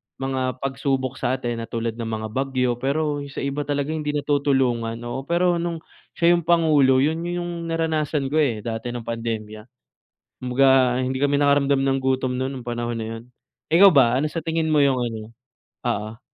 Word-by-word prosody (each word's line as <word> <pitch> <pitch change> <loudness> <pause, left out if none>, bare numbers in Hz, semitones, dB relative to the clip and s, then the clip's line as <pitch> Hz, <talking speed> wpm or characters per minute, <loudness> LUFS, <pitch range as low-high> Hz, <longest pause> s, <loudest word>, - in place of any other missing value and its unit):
mga 135 -1 -3 0.2
pagsubok 135 -1 -2
sa 130 - 0
atin 120 -3 -4
na 115 - -5
tulad 115 -1 -3
ng 115 - -3
mga 110 -1 -3
bagyo, 130 -1 0
pero 145 +2 -1
yung 140 - -6
sa 135 - -6
iba 140 +1 -3
talaga 145 +1 -1
hindi 150 -2 -2
natutulungan, 135 -5 +1
oo. 130 +3 -5
Pero 175 +1 +2
nung 170 -1 -3 0.4
siya 170 0 +4
'yong 170 - -2
Pangulo, 150 -6 +4
'yon 160 +2 0
'yong 175 -1 -4
naranasan 155 -3 -1
ko, 155 - +2
eh, 115 -8 0
dati 115 +1 -4
no'ng 120 -1 -5
pandemya. 110 -1 -5 0.7
Kumbaga, 130 0 +3
hindi 130 +1 -1
kami 145 0 +2
nakaramdam 140 -1 +3
ng 135 0 +1
gutom 130 -1 0
no'n 130 +1 -2
nong 120 - -14
panahon 120 0 -3
na 110 - -4
'yon. - - -12 0.5
Ikaw 195 +4 +8
ba, 125 -4 +4
ano 155 - 0
sa 160 +1 -5
tingin 165 -1 0
mo 150 -2 +3
'yong 130 -2 +2
ano? 115 -2 -3 0.7
Oo. 110 0 -3
135 Hz, 185 wpm, -23 LUFS, 120-150 Hz, 0.7 s, Ikaw